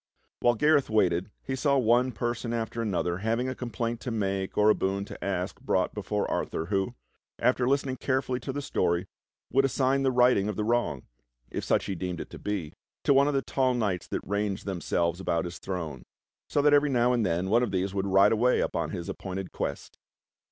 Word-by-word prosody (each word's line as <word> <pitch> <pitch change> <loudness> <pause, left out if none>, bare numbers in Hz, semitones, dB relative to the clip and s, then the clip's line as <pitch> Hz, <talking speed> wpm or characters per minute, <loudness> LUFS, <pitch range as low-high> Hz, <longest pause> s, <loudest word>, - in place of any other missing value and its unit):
While 120 0 +3
Gareth 150 +3 +3
waited 95 -4 +2
he 130 - -3
saw 140 +1 +2
one 125 +1 +3
person 120 +1 -3
after 115 0 -2
another 90 -5 -1
having 115 +4 0
a 130 - -2
complaint 120 -2 -3
to 130 - -4
make 100 -4 -2
or 105 +1 +6
a - - +5
boon 100 0 -1
to - - -9
ask 95 +3 -3
brought 95 -8 0
before 105 0 -2
Arthur, 80 - -2
who, 100 +5 -1 0.4
after 125 0 +2
listening 135 -1 0
carefully 130 -1 -1
to 135 - -5
the 145 +2 -4
story, 85 -9 0 0.5
would 135 - +4
assign 135 0 +2
the 135 - +3
righting 125 -5 +4
of 105 - -3
the 105 - -1
wrong 110 - 0 0.2
— - - -41
if - - -3
such - - +1
he 100 - -2
deemed 90 -1 -4
it - - -7
to - - -9
be 95 -7 -3 0.2
— - - -66
to - - +4
one 140 +1 +5
of 145 - 0
the 135 - +1
tall 130 -2 +1
knights 100 -7 -1
that - - -4
ranged 100 -1 -2
themselves 85 -2 -1
about 90 -1 0
his 85 0 -7
throne; 80 -9 -5 0.5
so 145 - +1
that 145 0 +5
every 145 0 +5
now 125 -1 +3
and 120 -2 +1
then 90 +1 0
one 120 +2 +5
of 125 - 0
these 95 0 -1
would 100 0 -1
ride 100 +2 +5
away 120 +3 +3
upon - - -1
his 85 - -5
appointed 95 -1 -5
quest. - - -5
110 Hz, 215 wpm, -28 LUFS, 95-125 Hz, 0.5 s, or